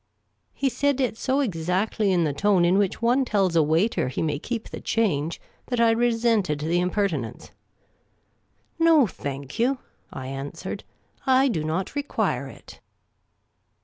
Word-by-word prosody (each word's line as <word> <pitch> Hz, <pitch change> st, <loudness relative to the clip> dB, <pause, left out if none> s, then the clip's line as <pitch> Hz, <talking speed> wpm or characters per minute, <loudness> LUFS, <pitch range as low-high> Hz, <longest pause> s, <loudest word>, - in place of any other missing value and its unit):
' -, -, -48 dB
' -, -, -49 dB
He 275 Hz, -, 0 dB
said 275 Hz, +2 st, +1 dB
it 255 Hz, -4 st, 0 dB
so 265 Hz, +4 st, 0 dB
exactly 195 Hz, -, 0 dB
in 175 Hz, -2 st, +3 dB
the 150 Hz, -3 st, 0 dB
tone 190 Hz, +2 st, +3 dB
in 180 Hz, +3 st, +3 dB
which 200 Hz, +3 st, -1 dB
one 245 Hz, +3 st, +3 dB
tells 195 Hz, -7 st, +1 dB
a 165 Hz, -, +6 dB
waiter 160 Hz, -, +1 dB
he 130 Hz, -, -2 dB
may 150 Hz, -2 st, -1 dB
keep 230 Hz, +6 st, -4 dB
the -, -, -8 dB
change 170 Hz, -8 st, 0 dB, 0.3 s
that 245 Hz, -2 st, -1 dB
I 230 Hz, -1 st, +5 dB
resented 225 Hz, -9 st, +1 dB
the 165 Hz, +3 st, +1 dB
impertinence. 180 Hz, -, -2 dB, 0.6 s
" -, -, -43 dB
No, 310 Hz, -5 st, +6 dB
thank 140 Hz, -, -6 dB
you," 260 Hz, +4 st, +2 dB, 0.3 s
I 130 Hz, -, -7 dB
answered. 135 Hz, +1 st, -6 dB, 0.3 s
" -, -, -33 dB
I 270 Hz, +1 st, +4 dB
do 160 Hz, -10 st, -1 dB
not 160 Hz, +5 st, -2 dB
require 285 Hz, 0 st, -1 dB
it." -, -, -13 dB
200 Hz, 165 wpm, -25 LUFS, 160-235 Hz, 0.6 s, a